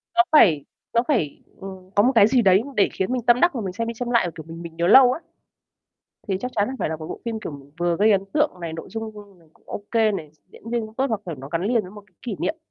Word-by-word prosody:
nó 350 - +7
phải 165 - +5 0.3
nó 235 - +4
phải, 195 - 0 0.2
ừm, 190 -1 -10
có 205 - +5
một 250 - +4
cái 205 -3 +7
gì 250 +1 +3
đấy 190 -2 +5
để 200 - +3
khiến 190 +5 -2
mình 255 -1 0
tâm 240 0 +5
đắc 350 - +4
và 245 - -3
mình 190 -3 -4
xem 230 +4 -3
đi 230 - -3
xem 240 +1 -5
lại 235 -7 +3
và, - - -5
kiểu, 160 - -8
mình 165 +1 -9
mình 165 -1 -9
nhớ 170 +1 0
lâu 250 +5 +8
á. - - -6 1.1
Thì 190 -2 0
chắc 250 +3 -4
chắn 205 -1 +2
là 260 - -4
phải - - -1
là 160 - -2
một 155 0 -8
bộ - - -7
phim 225 -1 -3
kiểu 215 - -6
m 140 -1 -10 0.2
vừa 175 -1 +1
gây 215 +2 +4
ấn 195 -2 +3
tượng 300 0 +2
này, 165 -1 -5
nội 165 +3 -8
dung 210 -2 -8
này 165 - -23
cũng - - -29
ô 205 - -6
kê 225 -2 +3
này, 165 -7 -6 0.2
diễn 230 - -12
viên 235 0 0
cũng 215 0 -14
tốt 265 - +1
hoặc, 220 -3 -2
kiểu, 170 -3 -5
nó 135 0 -9
gắn 165 +2 -2
liền 230 +2 +2
với 185 -2 -11
một 205 0 -12
cái 190 - -32
kỷ 230 -5 -4
niệm. 315 - -2
205 Hz, 305 wpm, -23 LUFS, 175-235 Hz, 1.1 s, lâu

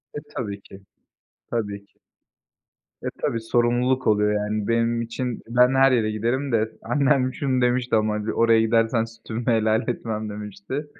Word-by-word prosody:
E, - - -2
tabii 100 -3 -4
ki, 95 0 -14 0.7
tabii 100 -3 -3
ki. - - -39 1.0
E, - - -9 0.2
tabii, 115 - 0
sorumluluk 120 +3 +1
oluyor 105 0 +3
yani. 105 0 -2
Benim 115 0 +1
için 120 +1 -4
ben 125 +2 +4
her 135 0 +5
yere 110 -3 +2
giderim 120 +6 -1
de 110 -1 +1
annem 135 -3 +2
şunu 130 -3 0
demişti 125 -1 +1
ama, 110 0 +2
hani, 105 +1 -2
"Oraya 115 -1 +4
gidersen 115 0 +2
sütümü 115 0 -7
helal 110 -1 +3
etmem." 110 -3 -3
demişti. 105 +7 -6
115 Hz, 155 wpm, -23 LUFS, 110-125 Hz, 1.0 s, her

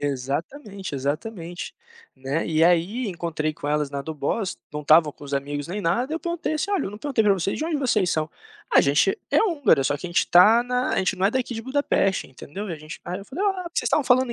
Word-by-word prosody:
Exatamente, 160 - -4
exatamente. 170 +6 -4 0.4
Né, 135 +4 -2
e 160 0 +3
aí 180 +8 +2
encontrei 165 -4 -2
com 145 - -6
elas 150 -1 +1
na 140 0 -4
Doboz, 160 +7 -2 0.2
não 150 - -3
estavam 155 +1 +5
com - - -19
os 140 - -9
amigos 145 +1 -3
nem 200 +4 -3
nada, 235 - 0
eu 325 - -1
perguntei 340 -1 -3
assim: 310 +6 -2
"Olha, 385 -7 +1
eu - - -5
não 210 - -9
perguntei 270 -3 0
para 210 -2 +4
vocês, 195 0 -1
de 310 - -2
onde 325 -1 -1
vocês 220 -10 +1
são?", 155 0 0 0.5
"a - - +9
gente 145 - +3
é - - +4
húngara, 300 - +3
só 145 - +1
que 165 - -7
a - - -5
gente 175 - +3
está 215 +7 +6
na 250 +1 0
a - - 0
gente 190 -1 +1
não 185 - -1
é - - +2
daqui 255 0 -2
de 225 - -5
Budapeste, 260 -7 0
entendeu, 175 +10 -8
e 170 - -4
gente" 155 0 -9
aí 180 +2 -4
eu 200 - -10
falei: 290 - -4
"Ah, 370 -4 -1
vocês - - -1
estavam 305 - +2
falando 250 0 +3
190 Hz, 240 wpm, -24 LUFS, 155-250 Hz, 0.5 s, a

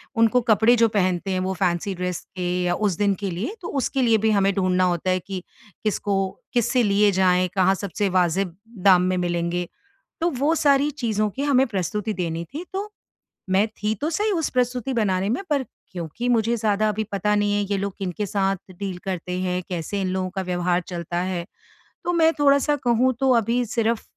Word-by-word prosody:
उनको 230 +2 +4
कपड़े 220 +3 +5
जो - - +7
पहनते 185 0 0
हैं, 185 - 0
वो 185 +1 -1
फैंसी 185 +1 -1
ड्रेस 180 -1 -3
के 180 -1 -2 0.2
या 175 0 +1
उस 185 -5 -2
दिन 200 -1 +2
के 195 - 0
लिए, 205 - -4
तो 345 - -6
उसके 270 +1 -1
लिए 230 -3 +4
भी 220 - +4
हमें 200 -1 +3
ढूँढना 185 -1 +2
होता 180 0 0
है 185 - +1
कि 185 0 -6 0.4
किसको 205 -1 0 0.4
किससे 245 +1 +2
लिए 205 0 +4
जाएँ, 185 -1 +3
कहाँ 190 0 +4
सबसे 200 +1 -2
वाज़िब 180 0 +1 0.3
दाम 185 -2 +7
में - - 0
मिलेंगे, 175 0 -1 0.5
तो 340 - +3
वो 290 +4 +1
सारी 285 -1 +3
चीज़ों 220 -6 -1
की 265 +8 -4
हमें 270 -2 +3
प्रस्तुति 210 +1 -2
देनी 170 -3 -3
थी। 320 +5 -5
तो 405 +2 -4 0.6
मैं 195 +3 +3
थी 215 -1 -3
तो 305 - 0
सही 420 +5 0
उस 330 -6 0
प्रस्तुति 250 0 0
बनाने 195 -4 +1
में, 245 - 0
पर 285 -3 +1 0.3
क्योंकि 175 +7 -5
मुझे 230 -1 +2
ज़्यादा 215 0 +1
अभी 215 +1 -1
पता 210 +1 0
नहीं 205 0 +1
है 205 - +1
ये 200 - +2
लोग 200 0 -3
किनके 195 +1 -3
साथ 195 0 0 0.2
डील 195 -3 -4
करते 180 -1 -3
हैं? 180 0 -1
कैसे 180 +3 -3
इन 190 - -1
लोगों 185 0 -1
का 190 - -1
व्यवहार 180 0 0
चलता 175 -1 -4
है? 180 -2 -3 0.6
तो 350 - 0
मैं 325 -1 +4
थोड़ा-सा 280 +1 +4
कहूँ, 245 +2 +3
तो 270 -1 +3
अभी 235 +2 +1
सिर्फ़ 230 0 0
200 Hz, 200 wpm, -23 LUFS, 185-235 Hz, 0.6 s, जो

